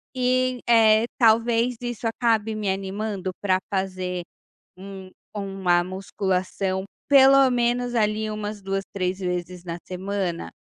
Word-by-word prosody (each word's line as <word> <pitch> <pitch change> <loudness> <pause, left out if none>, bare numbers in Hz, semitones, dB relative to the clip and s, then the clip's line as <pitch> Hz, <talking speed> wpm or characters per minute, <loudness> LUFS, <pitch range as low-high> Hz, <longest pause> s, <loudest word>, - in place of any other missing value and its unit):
E, 255 0 +1
eh, 225 -1 +5
talvez 230 +1 +3
isso 240 -1 -3
acabe 225 -2 0
me 210 -2 -2
animando 195 0 -3
pra 185 -2 +2
fazer 185 -2 -2 0.5
um 190 0 -10 0.2
uma 195 -4 0
musculação, 190 0 -2 0.2
pelo 275 -1 +7
menos, 245 0 0
ali, 215 -1 +1
umas 210 0 -5
2, 195 0 -2
3 185 0 -2
vezes 180 -1 -4
na 170 -1 -5
semana? 185 - -3
200 Hz, 120 wpm, -24 LUFS, 185-230 Hz, 0.5 s, pelo